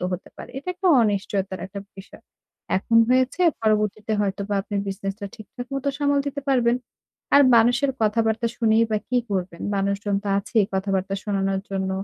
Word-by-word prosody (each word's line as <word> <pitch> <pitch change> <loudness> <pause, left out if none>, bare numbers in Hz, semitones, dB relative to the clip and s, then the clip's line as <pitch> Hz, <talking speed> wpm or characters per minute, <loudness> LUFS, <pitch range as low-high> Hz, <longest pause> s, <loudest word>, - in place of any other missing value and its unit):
তো - - -2
হতে 180 - -5
পারে। - - -10
এটা 325 - -9
একটা 375 +1 -3 0.2
অনিশ্চয়তার 200 -2 -1
একটা 200 +1 -7 0.2
বিষয়। 195 - -13 0.5
এখন 230 +4 +1
হয়েছে, 255 +6 +2 0.2
পরবর্তীতে 215 0 0
হয়তোবা 200 0 -2
আপনি 205 - -7
বিজনেসটা 195 +1 -4
ঠিকঠাক 245 +3 -9
মতো 275 +1 -1
সামাল 285 -1 +2
দিতে 285 0 -3
পারবেন। 245 -2 +3 0.6
আর 285 - +8
মানুষের 245 +4 +4
কথাবার্তা 225 +1 +1
শুনেই 225 -1 +3
বা 215 - +1
কি 250 0 +2
করবেন? 180 -3 -3 0.2
মানুষজন 200 +1 -1
তো - - -2
আছেই 210 +1 +1
কথাবার্তা 195 0 -1
শোনানোর 195 -2 0
জন্য। 190 -1 -2
210 Hz, 160 wpm, -23 LUFS, 195-240 Hz, 0.6 s, আর